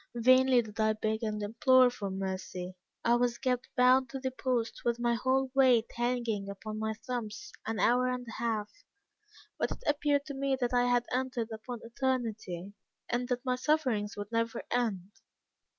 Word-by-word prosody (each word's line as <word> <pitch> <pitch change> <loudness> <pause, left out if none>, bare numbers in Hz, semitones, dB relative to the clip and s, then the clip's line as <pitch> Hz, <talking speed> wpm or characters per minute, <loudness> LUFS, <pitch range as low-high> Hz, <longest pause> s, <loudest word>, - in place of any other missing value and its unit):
"Vainly 255 +1 +5
did 215 0 -11
I 220 0 +3
beg 220 +1 -2
and 210 -2 -2
implore 255 +3 +5
for 205 -5 -5
mercy. 190 -1 -4 0.3
I 235 - +4
was 240 -1 +1
kept 250 -1 -1
bound 255 0 +5
to 270 - -5
the 260 0 -2
post 250 -3 -2
with 235 -1 +1
my 240 0 +2
whole 260 +2 +1
weight 255 -4 +4
hanging 235 -4 -1
upon 215 +2 -6
my 220 0 -2
thumbs, 235 -5 -5 0.2
an 225 0 -2
hour 250 +1 +3
and 250 -1 -3
a - - -7
half, 220 -3 -1 0.9
but - - +1
it - - -7
appeared 290 -1 +1
to 290 - -6
me 270 0 0
that 245 -1 -1
I 245 0 +4
had 245 -1 +2
entered 250 -3 -2
upon 225 +2 -6
eternity, 225 -7 -3 0.4
and 245 +1 -1
that 250 +1 -2
my 255 -1 +1
sufferings 255 -8 0
would 205 +1 -6
never 230 0 -1
end. 210 -6 -1
240 Hz, 175 wpm, -31 LUFS, 220-255 Hz, 0.9 s, Vainly